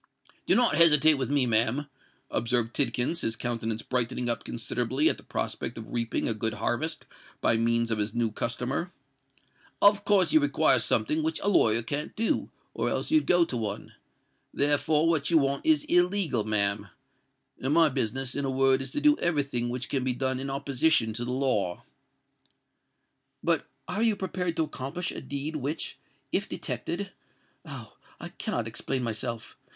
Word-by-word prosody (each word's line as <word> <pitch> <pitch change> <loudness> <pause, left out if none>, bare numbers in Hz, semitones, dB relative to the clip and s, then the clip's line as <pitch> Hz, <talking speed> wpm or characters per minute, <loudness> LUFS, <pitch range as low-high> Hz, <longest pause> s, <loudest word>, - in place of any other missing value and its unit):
"Do - - +4
not 245 -1 +3
hesitate 155 -2 +8
with 130 - -2
me, 140 -2 +2
ma'am," 115 +5 +1 0.5
observed 120 0 -1
Tidkins, 130 +4 0
his 115 - -2
countenance 115 -2 -3
brightening 125 -1 -1
up 115 - -2
considerably 125 +5 -1
at - - -1
the - - -13
prospect 115 - -4
of 115 - -9
reaping 115 -1 -1
a 115 - +1
good 110 0 -1
harvest 155 +7 -2 0.3
by - - +2
means 115 0 +1
of 110 - -1
his 105 +2 -2
new 115 -2 0
customer. 125 +10 -3 0.9
"Of 205 0 +5
course 205 - +3
you 315 - +7
require 290 -1 +3
something 310 +1 +1
which 320 +1 -1
a 205 - +1
lawyer 115 - +3
can't 145 +6 -4
do, 225 +1 0 0.2
or - - -1
else - - -2
you'd 315 -1 +3
go 175 -1 +4
to 130 - -4
one: 105 -3 -4 0.6
therefore 150 +2 +3
what 160 -3 +1
you 170 - +4
want 140 - 0
is 315 -2 +4
illegal, 180 - +2
ma'am; 100 -2 0 0.7
and 130 - -1
my 165 -1 +6
business, 130 -1 -1
in 140 - -2
a 135 - -1
word, 135 0 +3
is 135 - -4
to 295 - -2
do 295 0 +4
every 160 -4 +1
thing 120 -3 -2
which 125 0 -4
can 135 -3 -1
be 130 -1 0
done 130 +1 -2
in 135 +1 -4
opposition 140 -3 +1
to 120 +2 -4
the 120 - -4
law." 125 -9 -1 1.6
"But - - 0 0.2
are 210 - -3
you 225 -2 +3
prepared 185 -3 -3
to 160 - +2
accomplish 155 +4 -4
a - - -7
deed 145 +3 -4
which, 145 +3 -4 0.3
if - - -1
detected——Oh! 195 +2 -7 0.2
I - - -7
cannot 115 -1 -4
explain 125 +3 -3
myself! 115 0 -4
135 Hz, 170 wpm, -27 LUFS, 115-165 Hz, 1.6 s, hesitate